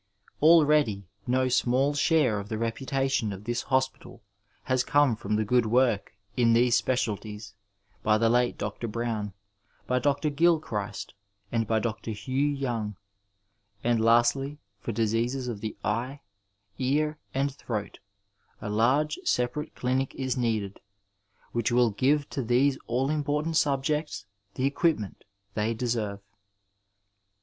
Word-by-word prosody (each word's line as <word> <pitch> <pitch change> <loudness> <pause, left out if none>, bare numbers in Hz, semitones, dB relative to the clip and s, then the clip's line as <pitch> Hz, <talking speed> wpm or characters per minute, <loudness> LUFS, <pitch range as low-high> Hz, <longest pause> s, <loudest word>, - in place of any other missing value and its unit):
Already 150 - +5 0.2
no 130 +1 +2
small 130 +3 +2
share 145 -7 +2
of 100 +1 -8
the 110 - -2
reputation 130 +1 -1
of 100 +1 -7
this 120 +2 -2
hospital 130 -1 -2 0.4
has 130 -1 +1
come 145 -5 +3
from 105 0 -2
the 110 0 +1
good 120 +1 +2
work 115 -5 +2 0.2
in 115 -2 +4
these 120 +1 +4
specialities 105 -4 -2 0.5
by 105 0 +3
the 115 +1 +3
late 120 +1 +2
Dr. 120 - -4
Brown, 110 -3 -3 0.5
by 125 0 +1
Dr. 145 +3 +1
Gilchrist, 145 - 0 0.4
and 115 -2 0
by 110 - +2
Dr. 110 +1 -3
Hugh 130 +7 -1
Young; 120 -7 -2 0.9
and 115 -1 +2
lastly, 120 +5 +3 0.2
for 100 +3 -4
diseases 115 +4 0
of 110 -4 -4
the 110 -1 -5
eye, 125 +6 -2 0.6
ear, 150 +4 0 0.2
and 135 +1 0
throat, 110 -6 -5 0.6
a 105 -1 -5
large 130 +8 +2
separate 125 +5 -1
clinic 130 +1 -1
is 130 -2 -2
needed, 110 -5 -1 0.7
which 120 +1 0
will 120 -1 +4
give 140 +7 +2
to 135 - -2
these 130 +3 +3
all 130 +4 0
important 150 +2 -1
subjects 150 -3 0 0.3
the 130 - 0
equipment 140 - 0 0.3
they 110 +2 0
deserve. 110 -4 -2
125 Hz, 130 wpm, -27 LUFS, 110-140 Hz, 0.9 s, Already